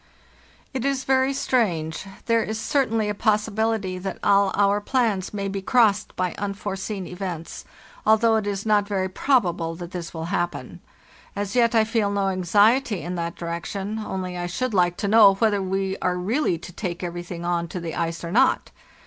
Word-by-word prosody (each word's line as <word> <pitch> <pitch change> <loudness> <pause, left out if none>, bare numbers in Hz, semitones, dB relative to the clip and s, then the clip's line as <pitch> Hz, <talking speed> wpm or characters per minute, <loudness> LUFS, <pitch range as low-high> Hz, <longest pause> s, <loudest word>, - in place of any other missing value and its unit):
"It 260 -3 -2
is 275 -1 0
very 265 0 +2
strange; 195 - 0 0.2
there 230 -1 +3
is 220 0 -3
certainly 225 -4 +1
a 210 - 0
possibility 215 -2 0
that 190 +1 -4
all 200 -1 +4
our 200 0 +3
plans 215 -5 0
may 200 -1 -3
be 195 0 -3
crossed 210 -1 +2
by 185 -1 -1
unforeseen 200 -1 -4
events, 180 -3 -6 0.4
al 220 0 +5
though 225 0 +3
it 215 -2 -2
is 200 0 -3
not 210 -2 +3
very 190 -2 -1
probable 180 -7 +1
that 175 +1 -8
this 175 -2 -6
will 160 -1 -5
happen. 175 -1 -3 0.5
As 200 +2 -3
yet 235 -1 +3
I 220 - +6
feel 220 -2 0
no 200 -1 0
anxiety 205 +4 +3
in 175 - -4
that 170 -1 -3
direction, 190 +5 -4
only 185 -4 -4
I 175 0 -3
should 240 +7 -2
like 175 -2 +2
to 205 - -2
know 205 -2 +7
whether 205 -1 +2
we 190 0 -1
are 180 0 0
really 200 - 0
to 175 +2 -11
take 175 -2 -4
everything 175 0 -5
on 170 -1 0
to 180 - -5
the 170 -1 -5
ice 165 0 -3
or 170 - -4
not. 220 - +2
200 Hz, 185 wpm, -24 LUFS, 180-220 Hz, 0.5 s, know